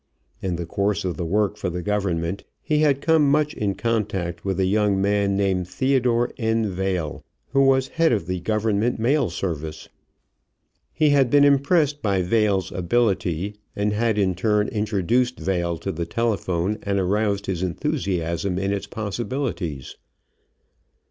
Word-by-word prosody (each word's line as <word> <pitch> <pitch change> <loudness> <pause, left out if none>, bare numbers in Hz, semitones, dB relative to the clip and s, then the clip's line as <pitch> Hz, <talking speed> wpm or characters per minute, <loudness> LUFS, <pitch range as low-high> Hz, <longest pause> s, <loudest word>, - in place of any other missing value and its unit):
In 90 -2 -2
the 85 0 -4
course 100 +2 -1
of 90 - -2
the 85 - -3
work 105 +3 +1
for 95 - -2
the 90 0 -4
Government 95 -3 -1 0.2
he 150 -1 +1
had 145 -3 +3
come 155 -3 +4
much 150 +1 +2
in 100 -2 -2
contact 100 -5 -2
with 95 -1 -2
a 95 - +3
young 100 0 +2
man 100 0 +1
named 95 -3 0
Theodore 120 +3 +1
N. 110 -2 0
Vail, 90 -5 -2 0.3
who 135 - +2
was 135 -1 +3
head 165 0 +2
of 105 -8 0
the 90 +1 -3
Government 110 +4 0
mail 120 +1 +2
service. 80 -3 -5 1.0
He 155 -2 +2
had 135 -3 +4
been 145 +2 +5
impressed 145 +1 +3
by 100 -3 +1
Vail's 100 -1 +1
ability 95 -1 0 0.2
and 105 +1 0
had 110 0 +1
in 95 -3 +2
turn 105 +3 +1
introduced 110 +3 0
Vail 85 -3 -1
to 95 - -4
the 85 -1 -4
telephone 105 -3 -1
and 100 0 -1
aroused 100 +1 0
his 95 -3 -2
enthusiasm 90 - -1
in 100 +1 0
its 100 - -4
possibilities. 105 - -4
100 Hz, 155 wpm, -23 LUFS, 90-120 Hz, 1.0 s, been